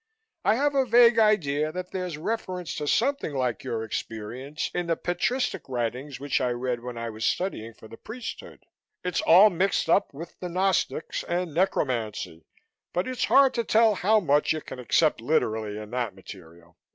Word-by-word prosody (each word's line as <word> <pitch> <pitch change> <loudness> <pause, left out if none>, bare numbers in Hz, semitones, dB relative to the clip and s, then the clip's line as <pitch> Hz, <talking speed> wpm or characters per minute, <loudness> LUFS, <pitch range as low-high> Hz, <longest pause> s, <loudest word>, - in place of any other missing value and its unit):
I 210 - +3
have 285 +3 +1
a 270 -1 +3
vague 235 -1 +6
idea 155 -9 +2
that 180 +2 -6
there's 180 -4 -4
reference 180 -1 -4
to 150 - -3
something 260 - 0
like 125 -3 -1
your 110 -1 -3
experience 115 +7 -5
in 175 -1 -2
the 165 - +1
Patristic 180 - -2
writings 125 +3 -3
which 140 -1 -1
I 125 - +1
read 120 0 -2
when 120 0 -7
I 115 0 -4
was 110 +1 -7
studying 115 - -2
for 110 - -14
the 115 - -12
priesthood. 230 +1 -8 0.4
It's 180 -1 -1
all 195 +5 +7
mixed 185 +3 0
up - - +3
with 165 +5 -10
the 180 - -5
Gnostics 185 -3 0
and 175 -2 -2
necromancy 115 - -1 0.5
but 180 +5 -1
it's 255 -1 -1
hard 270 -1 +5
to 235 - 0
tell 225 0 +4
how 215 +3 +3
much 150 -4 +2
you 155 - -4
can 130 - -9
accept 150 +3 +2
literally 110 -6 0
in 105 0 -8
that 120 -6 -2
material. 85 -3 -14
155 Hz, 175 wpm, -26 LUFS, 120-190 Hz, 0.5 s, all